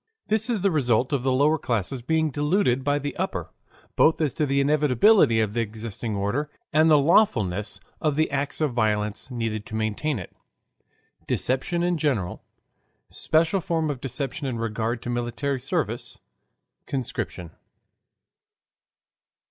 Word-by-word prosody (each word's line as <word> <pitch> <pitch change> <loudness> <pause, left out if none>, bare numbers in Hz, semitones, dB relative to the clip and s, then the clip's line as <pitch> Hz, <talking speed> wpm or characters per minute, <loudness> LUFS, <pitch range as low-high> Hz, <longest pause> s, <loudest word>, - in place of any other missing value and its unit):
This 220 +2 +2
is 225 -5 0
the 195 0 +2
Result 125 -3 +1
of 140 - +1
the 130 +1 +1
Lower 145 +4 +3
Classes 120 +2 -2
being 160 +4 +1
Deluded 145 -3 +1
by 145 +1 +1
the 145 0 -4
Upper, - - -3 0.4
Both 160 -1 +4
as 150 -5 0
to 150 - 0
the 140 +1 +1
Inevitability 145 - +4
of 110 -2 0
the 120 - 0
Existing 110 0 -5
Order 105 +10 -1 0.2
and 155 +2 +5
the 155 - +7
Lawfulness 115 - +2 0.2
of 150 -2 +1
the 155 0 +1
Acts 140 +2 -2
of 150 -5 +1
Violence 105 -1 0
Needed 115 -4 -3
to 110 - -6
Maintain 110 +7 -1
it 90 - -9 0.9
Deception 135 +7 0
in 175 -2 0
General 120 - -1 0.7
Special 165 +4 +1
Form 160 -3 0
of 130 -3 -7
Deception 135 +2 -3
in 125 -3 -3
Regard 115 +1 -2
to 120 - -3
Military 120 +3 -2
Service 125 - -3 0.7
Conscription. 110 - -4
135 Hz, 145 wpm, -25 LUFS, 115-155 Hz, 0.9 s, the